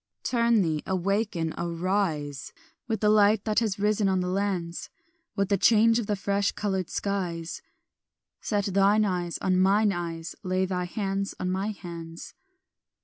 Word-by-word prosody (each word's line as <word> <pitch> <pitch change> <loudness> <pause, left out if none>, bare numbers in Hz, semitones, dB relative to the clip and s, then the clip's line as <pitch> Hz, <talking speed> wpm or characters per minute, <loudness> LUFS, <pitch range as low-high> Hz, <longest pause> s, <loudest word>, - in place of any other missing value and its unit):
"Turn 235 -3 +3
thee, 155 -3 -1
awaken, 190 -3 -1
arise, 170 -5 -2 0.3
With 220 -3 -2
the 210 - +4
light 210 0 +4
that 215 +1 +2
is 215 -3 -1
risen 210 0 +1
on 190 -1 +1
the 180 0 -1
lands, 185 -3 -2 0.5
With 200 0 0
the 200 -2 +2
change 230 +2 +5
of 220 - -4
the 210 - +1
fresh 200 +1 0
coloured 190 -4 -2
skies; 175 -4 -3 0.8
Set 205 -2 -1
thine 200 +2 +3
eyes 175 -3 -2
on 185 -1 +2
mine 200 +2 +4
eyes, 170 -1 -5
Lay 185 0 0
thy 180 -1 -2
hands 195 +1 -3
in 185 - -1
my 190 +2 -1
hands." 170 -5 -8
195 Hz, 150 wpm, -27 LUFS, 175-205 Hz, 0.8 s, change